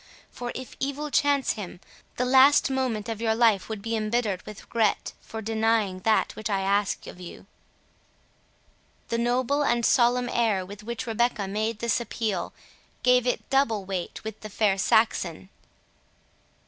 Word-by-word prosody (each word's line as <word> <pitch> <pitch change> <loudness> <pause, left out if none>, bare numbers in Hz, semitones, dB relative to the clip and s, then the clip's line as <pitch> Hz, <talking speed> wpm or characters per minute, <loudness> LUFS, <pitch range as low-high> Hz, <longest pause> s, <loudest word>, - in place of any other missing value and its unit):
For, 245 -1 -5
if 255 0 -7
evil 285 +2 -3
chance 285 -2 +2
him, 185 -4 -8 0.4
the 250 - 0
last 270 +2 +5
moment 250 -5 -1
of 225 -1 -4
your 220 -1 +1
life 225 -4 +3
would 215 -2 -5
be 225 0 -2
embittered 215 -3 -1
with 210 -1 -9
regret 225 -3 0
for 220 0 -7
denying 220 -3 +1
that 215 +3 +1
which 215 0 -4
I 195 -2 0
ask 200 +1 0
of - - -10
you." 180 +1 -10 1.6
The 230 - 0
noble 250 +4 +1
and 240 -4 +1
solemn 245 0 +3
air 215 -7 +1
with 205 +2 -10
which 235 +3 -5
Rebecca 230 -3 0
made 215 +3 -2
this 235 +1 0
appeal, 220 -5 -3 0.5
gave 250 0 +4
it 245 - -1
double 230 -7 +2
weight 185 -2 -5
with 220 0 -6
the 215 - -7
fair 205 -1 +2
Saxon. 190 -4 +1
225 Hz, 155 wpm, -26 LUFS, 205-245 Hz, 1.6 s, last